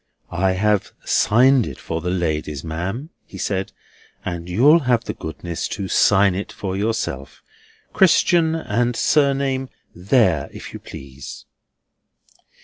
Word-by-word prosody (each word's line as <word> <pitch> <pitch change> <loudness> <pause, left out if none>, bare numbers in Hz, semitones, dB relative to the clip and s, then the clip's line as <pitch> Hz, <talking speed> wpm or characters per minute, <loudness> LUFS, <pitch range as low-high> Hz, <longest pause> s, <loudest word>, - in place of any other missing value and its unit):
"I 95 +1 +1
have 105 +1 0
signed 125 +2 +4
it 70 - -7
for 80 0 -4
the 90 - -2
ladies, 80 -5 -2
ma'am," 95 - -4
he 95 - -12
said, 95 0 -2 0.5
"and 85 -1 -5
you'll 140 - +5
have 120 -1 +3
the - - -4
goodness 85 +1 -5
to 95 -1 -4
sign 100 +1 +4
it 95 +3 -5
for 95 -2 -5
yourself, 100 -10 -3 0.5
Christian 170 -2 +4
and 120 -5 -1
Surname, 135 -2 +1 0.2
there, 90 - +2
if - - -10
you - - -7
please." 65 0 -10
100 Hz, 130 wpm, -21 LUFS, 85-125 Hz, 0.5 s, you'll